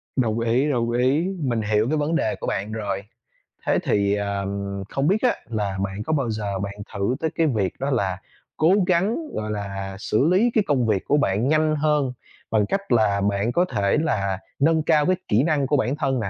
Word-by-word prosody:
Đồng 115 -4 +1
ý, 120 +5 +1
đồng 120 -4 0
ý, 130 +8 +2
mình 120 -7 0
hiểu 105 +2 +1
cái 155 - +1
vấn 150 +2 0
đề 110 -9 0
của - - -5
bạn 100 +2 -2
rồi. 100 -3 -3 0.6
Thế - - +2
thì, 100 0 +2
ờ, 100 -1 -2 0.4
không 135 +1 0
biết 200 +5 +2
á, 250 - +3
là 105 -4 -2
bạn 100 +1 -4
có 160 - 0
bao 140 -6 0
giờ 105 -3 -3
bạn 100 +1 -4 0.2
thử 100 +5 0
tới 160 - 0
cái 165 - +2
việc 105 -9 0
đó 135 +2 -1
là 100 -9 0 0.4
cố 160 +4 +4
gắng, 190 +5 +2 0.2
gọi 110 0 -3
là, 100 -2 -4
xử 115 +7 +1
lý 225 +6 +3
cái 215 - +3
công 130 -6 +2
việc 100 -3 0
của 145 - +2
bạn 105 -2 +1
nhanh 155 +1 +2
hơn 150 -3 +1 0.4
bằng 110 -2 +3
cách 195 - -3
là 105 -4 +3
bạn 100 +3 0
có 175 +7 +2
thể 100 +3 +2
là 100 - -1 0.2
nâng 160 +2 +3
cao 155 -2 +3
cái 185 - +3
kỹ 115 +5 +3
năng 150 -4 +1
của 145 - +2
bản 130 +1 0
thân 135 -3 0
nè, 100 -4 -2
120 Hz, 215 wpm, -23 LUFS, 100-150 Hz, 0.6 s, cố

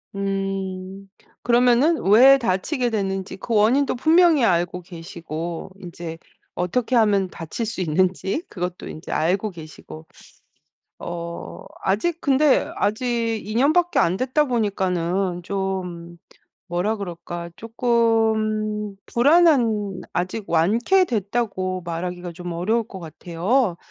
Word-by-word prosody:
음. 195 -1 -4 0.4
그러면은 245 +6 +4
왜 265 +6 +8
다치게 240 - -1
됐는지 195 -3 -3
그 230 +3 -3
원인도 250 +7 +3
분명히 320 0 +4
알고 175 -2 +1
계시고 170 0 -7
인제 170 -2 -7 0.4
어떻게 235 +8 -1
하면 200 -4 +3
다칠 170 +8 -5
수 210 -4 -4
있는지 185 - 0
그것도 180 -1 -5
인제 155 - -8
알고 190 +6 +1
계시고 155 -1 -11 0.9
어 170 - -7 0.2
아직 310 - 0
근데 280 0 +3
아직 230 +1 -1
2 215 +2 -6
년밖에 315 +7 +3
안 175 +3 +3
됐다 265 +5 +1
보니까는 190 -6 -1
좀 180 -3 -4 0.5
뭐라 180 +6 0
그럴까 175 -2 -6
쪼끔 220 -3 0
불안한 240 - +3
아직 185 +4 -3
완쾌됐다고 205 - +1
말하기가 175 +1 -4
좀 175 +1 -7
어려울 215 +7 0
것 190 - -9
같아요. 175 - -1
195 Hz, 235 characters per minute, -22 LUFS, 175-235 Hz, 0.9 s, 왜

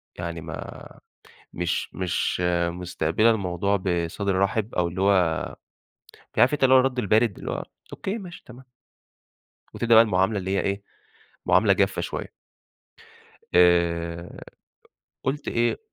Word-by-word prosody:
يعني 85 -2 -5
ما 80 0 -8 0.6
مش 90 0 -3
مش 90 -1 -1 0.3
مستقبلة 90 +4 +1
الموضوع 100 -1 0
بصدر 90 +1 -1
رحب 105 +3 0
أو 85 -1 +1
اللي 90 +2 -5
هو 95 -5 +1 0.8
عارف 130 - +5
أنت 140 - 0
اللي 130 0 +6
هو - - +8
الرد 130 -1 -1
البارد؟ 110 -1 +2
اللي - - -5
هو - - -3 0.3
أوكي، 200 +4 -4
ماشي، 180 -5 -10
تمام. 125 +1 -13 1.1
وتبدأ 115 -1 +2
بقى 115 - +9
المعاملة 95 0 +1
اللي 95 0 -4
هي - - +2
إيه، 100 0 -2 0.6
معاملة - - +4
جافة - - +1
شوية. - - -5 1.2
آآ 85 -1 +2 0.8
قُلت 140 +2 -2
إيه 120 0 +1
95 Hz, 130 wpm, -25 LUFS, 85-115 Hz, 1.2 s, بقى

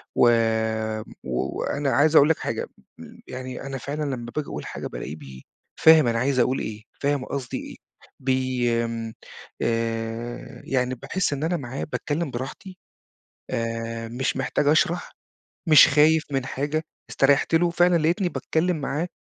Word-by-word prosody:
و 120 - +6 0.9
و 65 -1 -2
وأنا 140 -1 -1
عايز 155 +2 +3
أقول 145 +1 +7
لك 160 - +3
حاجة، - - -3 0.3
م - - -12
يعني 130 0 -6
أنا 135 -1 -5
فعلًا 145 +4 -4
لما 120 -1 -7
بآجي 150 -2 -2
أقول - - -6
حاجة - - -5
بالاقيه 75 - -6
بي 65 -4 -12 0.4
فاهم 160 -5 +7
أنا 115 0 +1
عايز 130 +1 +1
أقول 130 +2 +2
إيه، 110 0 -5 0.2
فاهم 140 -2 0
قصدي 135 -4 -4
إيه، - - -8 0.4
بي 130 -2 0
آمم، 115 -1 -4 0.5
آآ 115 +1 -3
يعني 130 -1 0
باحس 145 +6 -1
إن 145 +1 -3
أنا 170 +2 +1
معاه 130 -1 -5
باتكلّم 150 -1 -3
براحتي 135 +9 -7 0.7
آآ، 115 0 -3
مش 130 +3 -2
محتاج 135 +2 0
أشرَح، 175 +3 +2 0.6
مش 155 -2 +8
خايف 155 +2 +4
من 135 -2 -1
حاجة، 145 +4 -2 0.3
استريّحت 140 +4 +3
له، 170 +1 +4
فعلًا 175 0 +4
لقيتني 175 +4 +1
باتكلّم 175 +1 0
معاه 150 +4 -2
135 Hz, 155 wpm, -24 LUFS, 120-155 Hz, 0.9 s, مش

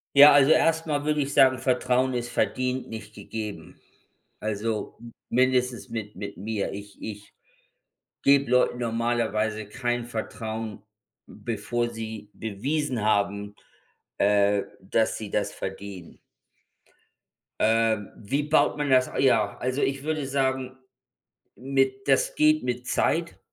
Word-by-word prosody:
Ja, 145 +1 +10
also 145 +1 +6
erst 165 0 +3
mal 145 -1 -1
würde 150 -1 +1
ich 140 0 -2
sagen, 130 -2 +5
Vertrauen 130 0 +1
ist 120 0 -3
verdient, 130 +1 -1
nicht 110 -1 -8
gegeben. 105 0 -7 0.6
Also 110 +1 -3 0.3
mindestens 125 0 +1
mit 110 -2 -5
mit 100 - -6
mir. 105 +1 -3
Ich 100 0 -9
ich 105 -1 -8 0.9
gebe 140 -2 +4
Leuten 125 -1 +3
normalerweise 115 -2 -1
kein 120 +1 -2
Vertrauen, 110 -2 -5 0.4
bevor 120 +1 -3
sie 110 -2 -7
bewiesen 125 +4 -2
haben, 100 -1 0 0.6
äh, 100 0 +3 0.2
dass 105 +4 0
sie 110 -2 -7
das 105 - -1
verdienen. 95 -2 -7 1.4
Äh, 115 0 +3 0.2
wie 135 +8 -2
baut 150 0 +2
man 145 -1 -1
das 130 -1 +4
ja, 110 -6 +3
also 130 +2 -2
ich 135 0 -1
würde 155 -2 -2
sagen, 130 -1 -1 0.8
mit 135 0 0
das 135 -1 +3
geht 155 -1 +3
mit 125 0 -3
Zeit 170 +1 0
120 Hz, 120 wpm, -26 LUFS, 105-135 Hz, 1.4 s, Ja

